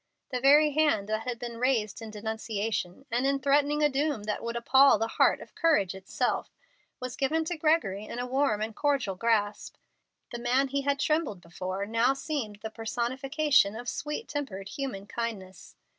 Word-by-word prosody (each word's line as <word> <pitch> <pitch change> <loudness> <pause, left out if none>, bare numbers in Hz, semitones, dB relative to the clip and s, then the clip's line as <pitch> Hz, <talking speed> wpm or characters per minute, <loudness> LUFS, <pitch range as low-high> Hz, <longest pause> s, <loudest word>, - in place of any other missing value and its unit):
The 250 - -1
very 295 +3 +6
hand 290 -9 +2
that 215 +2 -2
had 245 -1 -2
been 235 -1 -6
raised 235 -5 0
in 225 - -7
denunciation, 220 0 -3
and 245 +3 +1
in 275 0 +2
threatening 285 +2 +2
a - - +7
doom 285 -4 -1
that 210 0 -3
would 235 0 -3
appall 265 +2 +5
the 225 +2 -1
heart - - +3
of - - -12
courage 300 - +2
itself, 190 0 -2 0.5
was 255 -1 -5
given 310 +3 0
to 350 - -2
Gregory 305 - +1
in 235 - -7
a 245 - -2
warm 255 -4 +1
and 220 0 -5
cordial 275 -8 0
grasp. 210 0 0 0.6
The 240 - -5
man 255 +3 +2
he 280 +1 0
had 280 0 0
trembled 305 - 0
before 185 +3 -5
now 230 +5 +2
seemed 265 -9 -4
the 220 - -4
personification 260 +2 +1
of 240 +2 -7
sweet 300 - -4
tempered 210 -10 -5
human 265 -9 -5
kindness. 205 -5 -6
240 Hz, 175 wpm, -28 LUFS, 215-280 Hz, 0.6 s, a